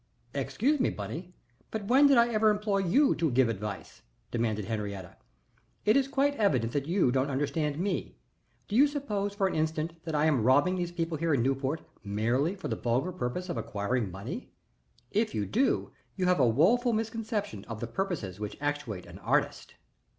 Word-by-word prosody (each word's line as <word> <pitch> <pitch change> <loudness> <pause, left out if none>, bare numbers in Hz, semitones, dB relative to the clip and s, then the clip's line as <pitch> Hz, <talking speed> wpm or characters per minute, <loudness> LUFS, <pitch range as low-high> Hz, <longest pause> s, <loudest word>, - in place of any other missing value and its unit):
"Excuse 290 +4 0
me, 255 - +3
Bunny, 180 +2 -6 0.3
but 220 -2 -4
when 265 +6 +6
did 275 -2 +5
I 235 0 +5
ever 215 0 +4
employ 210 -1 +1
you 230 - +4
to 165 -2 0
give 125 -1 +3
advice?" 105 -2 -5 0.3
demanded 110 -3 -1
Henriette. 100 -4 -5 0.6
"It 215 - +5
is 275 -1 +3
quite 280 +1 +2
evident 130 - +2
that 145 0 -1
you 170 -7 +3
don't 135 +2 +1
understand 145 +2 -1
me. 190 +4 -2 0.5
Do 205 - -3
you 280 +5 +7
suppose 210 -9 -3
for 200 -1 +1
an 190 - 0
instant 160 +1 -1
that 160 -2 -3
I 150 +1 +3
am 150 -6 +3
robbing 145 +9 +4
these 175 -1 -2
people 165 -2 -2
here 165 -2 +2
in 120 - +1
Newport 135 +4 0 0.2
merely 120 - 0
for 195 - -6
the - - -1
vulgar 125 +9 0
purpose 180 +2 -3
of 175 - -3
acquiring 105 +2 -1
money? 115 - -7 0.6
If 215 +2 0
you 105 - 0
do 255 - +1 0.2
you 185 - 0
have 180 -3 +3
a 130 - +5
woful 230 - +3
misconception 220 - -3
of 115 -2 -6
the 120 - -3
purposes 115 - -3
which 105 -1 -5
actuate 145 -10 -3
an - - -11
artist." - - -1
160 Hz, 185 wpm, -29 LUFS, -, 0.6 s, you